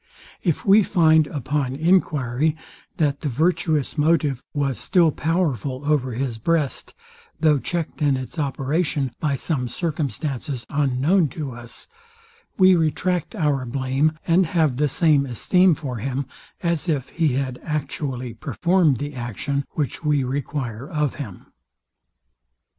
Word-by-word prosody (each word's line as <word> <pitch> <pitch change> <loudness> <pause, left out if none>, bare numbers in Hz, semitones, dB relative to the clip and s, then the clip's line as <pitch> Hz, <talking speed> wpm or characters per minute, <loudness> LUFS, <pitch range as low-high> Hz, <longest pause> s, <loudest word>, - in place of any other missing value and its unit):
If 170 -5 -1
we 205 +2 +7
find, 160 -5 +4
upon 140 -2 -2
enquiry, 155 -4 +2 0.4
that 145 -3 +1
the 145 - -1
virtuous 155 +1 0
motive 150 -4 +2
was 140 -5 -1
still 170 -4 +3
powerful 145 - -1
over 140 -4 +1
his 120 -2 -3
breast, 155 +2 -1 0.4
though 155 -3 +4
checked 165 +2 -4
in 140 -3 +3
its 130 +6 -6
operation 140 0 -1
by 150 -3 0
some 135 -2 -2
circumstances 145 -3 -3
unknown 145 +5 +2
to 145 -4 -3
us, 120 0 -10 0.7
we 185 -1 +7
retract 175 +4 0
our 145 -8 +1
blame, 135 +5 0
and 175 +1 +3
have 155 -6 +1
the 150 +1 +2
same 145 -2 +3
esteem 180 - +3
for 135 -5 -5
him, 135 +4 -3 0.4
as 170 0 0
if 140 -4 -1
he 160 -5 +1
had 130 -1 -2
actually 135 -5 -3
performed 170 +4 +1
the 145 +4 -5
action, 130 +3 -3
which 150 +1 -3
we 150 -3 +2
require 130 -2 -4
of 150 -3 0
him. 100 -10 -8
145 Hz, 130 wpm, -23 LUFS, 130-160 Hz, 0.7 s, we